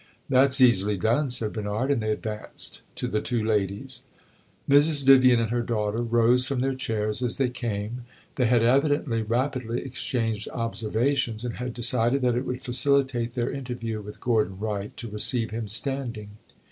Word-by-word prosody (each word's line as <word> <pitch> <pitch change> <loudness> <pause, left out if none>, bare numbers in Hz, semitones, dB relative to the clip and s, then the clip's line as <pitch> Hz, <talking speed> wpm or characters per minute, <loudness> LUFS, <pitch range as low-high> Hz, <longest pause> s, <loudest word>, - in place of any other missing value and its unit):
"That 135 +1 +4
's 140 - +3
easily 105 -5 +4
done," 120 - +1
said 115 -4 0
Bernard, 110 +5 -2
and 135 -5 +1
they 110 - -2
advanced 105 0 -4
to - - -3
the 105 +2 -1
two 120 -2 -2
ladies. 100 -3 -2 0.7
Mrs. 145 0 +4
Vivian 130 -3 +6
and 115 -1 -1
her 120 0 0
daughter 110 -1 -2
rose 120 +1 +3
from 130 0 -2
their 135 +1 0
chairs 110 -3 -2
as 125 -2 -1
they 135 -3 +1
came; 120 -1 -5 0.3
they 125 - +1
had 120 -1 +3
evidently 135 -1 +2
rapidly 120 +1 -2
exchanged 115 -4 -3
observations, 115 +1 -1
and 120 - -5
had 125 0 -5
decided 120 +2 +2
that 125 -1 +2
it 125 +3 -2
would 125 0 -4
facilitate 125 -1 +1
their 120 -2 -1
interview 120 -5 -5
with 105 0 -10
Gordon 110 -6 0
Wright 105 -1 -4
to 120 - -5
receive 110 +2 0
him 110 0 -4
standing. 115 -2 -3
120 Hz, 170 wpm, -25 LUFS, 110-130 Hz, 0.7 s, Vivian